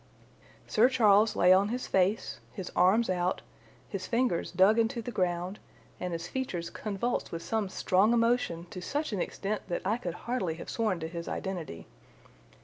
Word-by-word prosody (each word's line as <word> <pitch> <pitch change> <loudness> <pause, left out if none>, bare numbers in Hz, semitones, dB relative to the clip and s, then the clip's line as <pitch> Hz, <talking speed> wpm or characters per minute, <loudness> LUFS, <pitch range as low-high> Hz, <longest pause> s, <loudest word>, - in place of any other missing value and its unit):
Sir 235 +4 +4
Charles 215 -4 +4
lay 180 +1 +6
on 195 +2 +3
his 250 +2 -3
face, 195 +3 +1
his 190 -3 -6
arms 195 +6 +4
out, 180 0 -1 0.4
his 190 -2 -5
fingers 235 -7 0
dug 190 +5 +5
into 230 +2 +1
the 235 +2 -5
ground, 180 -1 -1 0.4
and 180 - -3
his 165 +1 -4
features 185 -10 -4
convulsed 215 +3 -2
with 165 0 -5
some 220 -4 -1
strong 190 +3 +2
emotion 230 -8 +1
to 180 - -6
such 290 +5 -2
an 190 - -1
extent 205 +4 -3
that 175 - -3
I 210 +4 +1
could 175 -8 -5
hardly 235 -10 -1
have 165 - -8
sworn 215 -6 0
to 160 - -3
his 170 0 -6
identity. 170 - -5
195 Hz, 170 wpm, -30 LUFS, 180-230 Hz, 0.4 s, lay